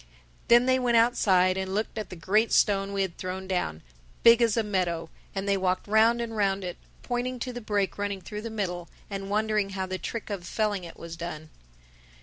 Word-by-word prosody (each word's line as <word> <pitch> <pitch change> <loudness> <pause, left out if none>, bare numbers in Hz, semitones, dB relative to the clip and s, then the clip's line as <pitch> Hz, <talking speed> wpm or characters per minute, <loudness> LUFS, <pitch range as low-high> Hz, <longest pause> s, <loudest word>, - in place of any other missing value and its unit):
Then 240 +1 +6
they 260 0 +3
went 240 -2 +3
outside 190 -6 +4
and 190 0 -3
looked 215 +2 -2
at 215 - -4
the - - -7
great 210 +7 +2
stone 195 -1 +3
we 200 -1 +1
had 185 -3 -5
thrown 185 +1 -4
down, 130 - -2 0.4
big 235 +1 +8
as 230 -1 +3
a 225 - +3
meadow; 175 -5 -1 0.2
and 195 +1 -2
they 200 - +3
walked 185 0 0
round 225 +3 +4
and 230 -1 -4
round 200 -2 +1
it, 180 -1 -5 0.3
pointing 250 +1 -2
to 250 +1 -4
the 245 - -6
break 205 -2 -1
running 200 -1 -2
through 210 +4 -6
the 230 - -5
middle 180 -5 -3 0.2
and 195 0 -4
wondering 210 -1 +1
how 190 - -1
the 185 0 -4
trick 220 +4 -5
of 195 -3 -4
felling 210 -4 -1
it 165 - -11
was 170 0 -8
done. 155 -2 -7
200 Hz, 210 wpm, -27 LUFS, 185-225 Hz, 0.4 s, big